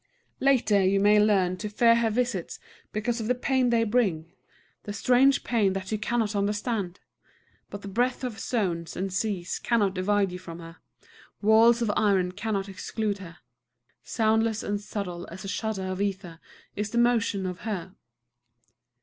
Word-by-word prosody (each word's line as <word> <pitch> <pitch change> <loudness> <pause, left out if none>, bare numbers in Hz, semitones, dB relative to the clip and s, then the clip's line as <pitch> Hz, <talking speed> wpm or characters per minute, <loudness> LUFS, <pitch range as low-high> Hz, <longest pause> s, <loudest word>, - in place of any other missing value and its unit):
Later 230 -7 +3
you 195 +1 +3
may 205 +1 +5
learn 195 -4 +2
to 210 +3 -5
fear 230 +3 +4
her 230 -1 +2
visits 225 -5 -2 0.3
because 230 +2 -2
of 215 - -3
the 250 - +2
pain 255 0 +1
they 230 -1 +3
bring, 195 -8 0 0.5
the 205 - -6
strange 260 +5 +3
pain 210 -6 +1
that 195 0 -5
you 215 - -1
cannot 220 -1 -1
understand. 205 -2 -2 0.7
But 205 - -8
the - - -7
breadth 245 +6 0
of 240 -4 -4
zones 175 -8 -2
and 190 0 -3
seas 185 -3 -2
cannot 210 -5 +1
divide 195 +1 +1
you 180 - -6
from 170 -3 -9
her; 165 0 -11 0.6
walls 225 +3 +5
of 215 - +1
iron 195 -4 +2
cannot 200 0 -3
exclude 200 +2 -3
her. 175 -3 -10 0.7
Soundless 220 -1 +1
and 205 0 -2
subtle 195 -4 -5
as 185 +3 -9
a - - -5
shudder 205 -1 -3
of 185 +1 -3
ether 190 -4 -3 0.4
is 210 +1 -2
the 235 - -3
motion 230 -5 +2
of 180 -1 -4
her. 190 -4 -5
205 Hz, 165 wpm, -27 LUFS, 190-230 Hz, 0.7 s, may